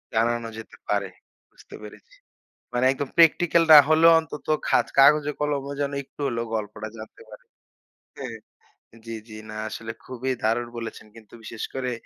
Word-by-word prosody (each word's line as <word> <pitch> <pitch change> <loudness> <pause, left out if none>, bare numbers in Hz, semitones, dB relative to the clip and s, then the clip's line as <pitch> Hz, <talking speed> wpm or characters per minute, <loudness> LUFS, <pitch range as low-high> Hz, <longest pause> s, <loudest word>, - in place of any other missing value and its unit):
জানানো 115 +1 +1
যেতে 110 - -11
পারে। 100 -1 0 0.4
বুঝতে - - -15
পেরেছি। 470 - -13 0.6
মানে 125 +1 +1
একদম 135 0 -4
practical 170 +1 +5
না 150 - +12
হলেও 160 +1 +6
অন্তত 160 -2 -8 0.2
খাত - - +2
কাগজে 150 +1 +5
কলমে 140 -1 -2
যেন 140 - -1
একটু - - -35
হলেও 115 -2 -2
গল্পটা 105 0 -5
জানতে 110 +1 -12
পারে। 105 - -13 1.6
জ্বি, 115 - -6
জ্বি, 110 - -11
না 110 - -8
আসলে 115 +1 -6
খুবই 130 +1 -4
দারুণ 115 +2 0
বলেছেন। 110 -2 -7
কিন্তু 110 -2 -17
বিশেষ 110 0 -7
করে 130 -1 -3
120 Hz, 150 wpm, -24 LUFS, 110-145 Hz, 1.6 s, না